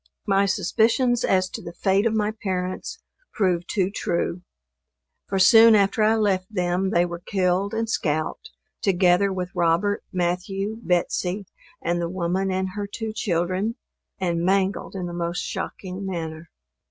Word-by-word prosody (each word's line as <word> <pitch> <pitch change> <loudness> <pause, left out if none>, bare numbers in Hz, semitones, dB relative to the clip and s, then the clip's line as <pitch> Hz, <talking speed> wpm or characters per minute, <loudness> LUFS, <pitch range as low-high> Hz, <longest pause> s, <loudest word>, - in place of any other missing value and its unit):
My 200 0 +3
suspicions 225 +6 +2
as 185 -1 +2
to - - -6
the 170 - -8
fate 195 +3 +2
of 220 - 0
my 210 0 +1
parents 190 - -4 0.3
proved 180 -5 0
too 195 -2 0
true; 170 -3 -2 0.9
for 195 - -1
soon 225 +4 +8
after 200 +1 +2
I 215 +1 +4
left 195 -3 0
them 180 -1 0
they 175 -3 +3
were 170 -1 -6
killed 190 +2 0
and 225 0 -1
scalped, 155 - -2 0.3
together 190 0 +3
with 180 -1 -3
Robert, 175 +5 +1
Matthew, 195 +3 -2
Betsey, 180 +1 0 0.4
and 175 +1 0
the 170 - -2
woman 185 +2 -1
and 190 0 -1
her 205 +2 -5
two 220 +1 -5
children, 185 +2 -1 0.4
and 170 -3 0
mangled 195 +2 0
in 185 -2 -3
the 175 - -5
most 170 0 -2
shocking 190 0 -5
manner. 165 -3 -5
190 Hz, 150 wpm, -24 LUFS, 175-205 Hz, 0.9 s, soon